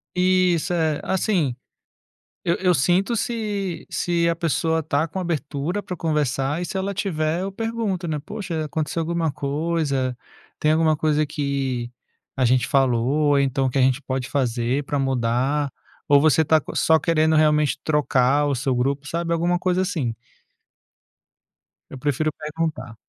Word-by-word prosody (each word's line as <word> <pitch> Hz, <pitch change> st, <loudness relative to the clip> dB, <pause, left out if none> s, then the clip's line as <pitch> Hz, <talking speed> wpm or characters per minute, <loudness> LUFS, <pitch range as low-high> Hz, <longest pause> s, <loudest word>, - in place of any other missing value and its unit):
Isso, 180 Hz, -2 st, +2 dB
é. 160 Hz, -3 st, +1 dB
Assim, 180 Hz, -, 0 dB, 0.9 s
eu 170 Hz, -, +1 dB
eu 180 Hz, -1 st, +2 dB
sinto 180 Hz, -, +2 dB
se 205 Hz, -6 st, -3 dB
se 170 Hz, -1 st, 0 dB
a 170 Hz, -, +1 dB
pessoa 165 Hz, -1 st, 0 dB
está 155 Hz, -1 st, 0 dB
com 190 Hz, -, -4 dB
abertura 170 Hz, +2 st, -2 dB
pra 180 Hz, -, -6 dB
conversar, 150 Hz, -1 st, 0 dB
e 180 Hz, -, -2 dB
se 190 Hz, -, -4 dB
ela 195 Hz, +1 st, -2 dB
tiver 165 Hz, -4 st, -1 dB
eu 195 Hz, +1 st, -3 dB
pergunto, 220 Hz, -4 st, -2 dB
né: 155 Hz, -2 st, -1 dB
"Poxa, 195 Hz, -6 st, -4 dB
aconteceu 155 Hz, +2 st, -2 dB
alguma 165 Hz, 0 st, -1 dB
coisa? 140 Hz, -3 st, -1 dB, 0.4 s
Tem 155 Hz, -, +2 dB
alguma 155 Hz, 0 st, +3 dB
coisa 155 Hz, 0 st, +1 dB
que 140 Hz, -5 st, -2 dB, 0.5 s
a 130 Hz, -, +2 dB
gente 125 Hz, -1 st, +3 dB
falou, 125 Hz, -4 st, +2 dB
ou 145 Hz, 0 st, +3 dB
então 135 Hz, -1 st, +1 dB
o -, -, +2 dB
que 130 Hz, -, -2 dB
a 135 Hz, -, +4 dB
gente 130 Hz, +2 st, +2 dB
pode 130 Hz, -1 st, -3 dB
fazer 125 Hz, 0 st, 0 dB
pra 145 Hz, -, -2 dB
mudar? 135 Hz, +2 st, 0 dB, 0.4 s
Ou 145 Hz, -1 st, +6 dB
você 155 Hz, +1 st, +4 dB
está 155 Hz, 0 st, +3 dB
co -, -, -8 dB
só 160 Hz, -, +4 dB
querendo 160 Hz, -1 st, +2 dB
realmente 150 Hz, -1 st, +3 dB
trocar 145 Hz, -2 st, +2 dB
o 140 Hz, -, 0 dB
seu 130 Hz, +1 st, -1 dB
grupo?". 140 Hz, +3 st, -1 dB
Sabe, 170 Hz, +2 st, -2 dB
alguma 175 Hz, +1 st, +1 dB
coisa 185 Hz, 0 st, +1 dB
assim. 155 Hz, -, -2 dB, 1.7 s
Eu -, -, -8 dB
prefiro 150 Hz, +3 st, 0 dB
perguntar. 150 Hz, -6 st, -4 dB
155 Hz, 160 wpm, -23 LUFS, 135-170 Hz, 1.7 s, Ou